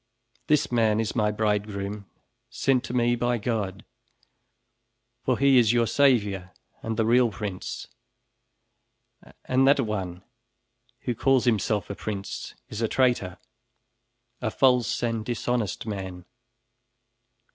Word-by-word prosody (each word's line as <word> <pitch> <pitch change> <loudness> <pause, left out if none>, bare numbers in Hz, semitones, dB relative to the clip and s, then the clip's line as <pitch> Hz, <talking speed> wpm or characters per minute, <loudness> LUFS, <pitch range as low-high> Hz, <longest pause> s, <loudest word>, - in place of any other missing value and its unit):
This 150 -4 +2
man 110 -3 +2
is 110 -3 -2
my 105 -3 +2
bridegroom, 105 -1 -2 0.4
sent 130 -2 +1
to 120 - -6
me 120 0 +3
by 120 0 0
God, 105 -4 -3 1.4
for 130 -2 +1
he 135 -2 +5
is 115 -1 +4
your 120 -1 +3
savior, 105 -9 +2 0.3
and 110 -1 -3
the 110 - +2
real 120 +1 +4
prince. 100 -3 -5 1.6
And 130 +1 +3
that 140 +1 +5
one 95 -6 -4 0.8
who 125 - -2
calls 130 +2 +2
himself 110 -3 +1
a - - -5
prince, 100 -2 -5
is 110 - -6
a 115 - +2
traitor; 120 -8 +1 1.0
a - - 0
false 125 -3 +2
and 115 -2 -1
dishonest 120 -3 -2
man." 95 -4 -6
110 Hz, 120 wpm, -26 LUFS, 105-125 Hz, 1.6 s, he